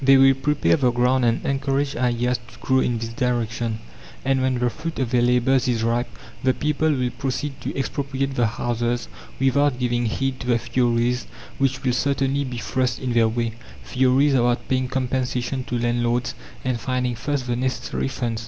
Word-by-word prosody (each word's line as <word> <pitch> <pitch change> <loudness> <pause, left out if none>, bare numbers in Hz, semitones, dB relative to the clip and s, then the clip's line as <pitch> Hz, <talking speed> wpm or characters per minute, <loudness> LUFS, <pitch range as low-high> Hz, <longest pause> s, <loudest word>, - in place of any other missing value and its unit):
They 135 0 +7
will 135 0 +7
prepare 150 +4 +2
the 130 -4 +3
ground 125 +1 +2
and 115 0 +1
encourage 135 0 0
ideas 125 0 +1
to 115 - -15
grow 130 0 +2
in 120 -2 +1
this 115 0 -4
direction; 115 -2 -1 0.5
and 135 0 +2
when 130 -1 +1
the 120 0 +1
fruit 160 +4 -6
of 130 -3 -1
their 125 -2 +3
labours 125 +2 +3
is 115 -3 +1
ripe, 120 +1 0 0.3
the 130 0 +2
people 150 +1 +1
will 125 -4 0
proceed 135 +2 -3
to - - -4
expropriate 135 0 -2
the 120 -3 +2
houses 120 +2 -1 0.3
without 135 0 +3
giving 120 -1 0
heed 135 +3 -1
to 125 - -6
the 120 -1 +3
theories 120 0 0 0.3
which 135 -1 0
will 125 -2 +2
certainly 140 +1 +1
be 125 -3 -5
thrust 125 +1 -1
in 130 -2 -2
their 115 -1 +4
way 115 0 -1 0.3
theories 130 +2 +3
about 120 -2 +2
paying 130 -1 +1
compensation 130 0 -1
to 120 - -2
landlords, 120 0 0 0.3
and 125 -2 0
finding 125 0 -1
first 130 +3 -2
the 120 -1 -1
necessary 130 +1 -2
funds. 120 -4 -2
125 Hz, 180 wpm, -23 LUFS, 120-135 Hz, 0.5 s, They